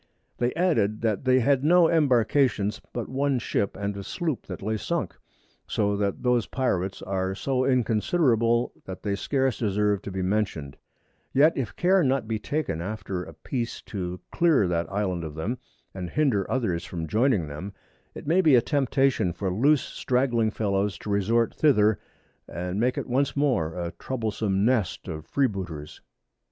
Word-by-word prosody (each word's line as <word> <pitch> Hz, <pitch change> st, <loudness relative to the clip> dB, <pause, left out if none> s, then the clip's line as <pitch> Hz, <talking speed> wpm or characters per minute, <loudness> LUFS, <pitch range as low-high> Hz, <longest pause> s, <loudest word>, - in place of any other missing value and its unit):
They 120 Hz, 0 st, +1 dB
added, 115 Hz, -, +1 dB
that 110 Hz, +2 st, -1 dB
they 130 Hz, 0 st, +4 dB
had 135 Hz, +2 st, +2 dB
no 170 Hz, +2 st, +6 dB
Embarkations, 125 Hz, -7 st, +2 dB
but 120 Hz, -3 st, -4 dB
one 135 Hz, 0 st, 0 dB
Ship, 100 Hz, -4 st, -1 dB
and 100 Hz, 0 st, -3 dB
a 100 Hz, -, -6 dB
Sloop 155 Hz, -, -3 dB
that -, -, -7 dB
lay 110 Hz, +2 st, -1 dB
sunk; 135 Hz, -, -2 dB, 0.5 s
so 100 Hz, -1 st, 0 dB
that 100 Hz, -1 st, -2 dB
those 125 Hz, -3 st, +2 dB
Pirates 95 Hz, -8 st, -1 dB
are 95 Hz, 0 st, -2 dB
so 130 Hz, +4 st, 0 dB
inconsiderable, 120 Hz, -1 st, +2 dB
that 95 Hz, 0 st, -8 dB
they 100 Hz, -, -1 dB
scarce 130 Hz, +5 st, 0 dB
deserve 105 Hz, -2 st, +1 dB
to -, -, -7 dB
be 95 Hz, -1 st, -3 dB
mentioned; 90 Hz, -8 st, -1 dB, 0.6 s
yet 150 Hz, +4 st, +5 dB
if 130 Hz, -5 st, -3 dB
Care 185 Hz, +2 st, +3 dB
be 145 Hz, -, +2 dB
not 130 Hz, -4 st, 0 dB
taken 140 Hz, -, -2 dB
after 95 Hz, -1 st, -4 dB
a -, -, -10 dB
Peace 120 Hz, -3 st, -4 dB
to 90 Hz, -3 st, -5 dB
clear 160 Hz, -, +3 dB
that 85 Hz, -1 st, -1 dB
Island 95 Hz, -4 st, -1 dB
of 75 Hz, -2 st, -6 dB
them, 110 Hz, +11 st, -3 dB, 0.3 s
and 90 Hz, -2 st, -5 dB
hinder 130 Hz, -, +1 dB
others 95 Hz, -10 st, -1 dB
from 85 Hz, -3 st, -5 dB
joining 110 Hz, -, +2 dB
them, 75 Hz, +7 st, -6 dB, 0.4 s
it -, -, -8 dB
may 170 Hz, +5 st, +3 dB
be 155 Hz, -7 st, +5 dB
a 120 Hz, -, +6 dB
Temptation 135 Hz, -, +1 dB
for 95 Hz, +1 st, -2 dB
loose 140 Hz, +8 st, +4 dB
stragling 125 Hz, -3 st, 0 dB
Fellows 100 Hz, -2 st, -1 dB
to 105 Hz, -, -6 dB
resort 110 Hz, +4 st, +2 dB
thither, 110 Hz, -8 st, +3 dB, 0.5 s
and 90 Hz, +4 st, -4 dB
make 125 Hz, +2 st, +1 dB
it -, -, -2 dB
once 135 Hz, +3 st, 0 dB
more 120 Hz, -, +1 dB
a 85 Hz, -2 st, -4 dB
troublesome 110 Hz, -5 st, -1 dB
Nest 115 Hz, -7 st, 0 dB
of 80 Hz, -3 st, -6 dB
Free 140 Hz, -, +2 dB
booters. 90 Hz, -, -5 dB
110 Hz, 165 wpm, -26 LUFS, 95-130 Hz, 0.6 s, no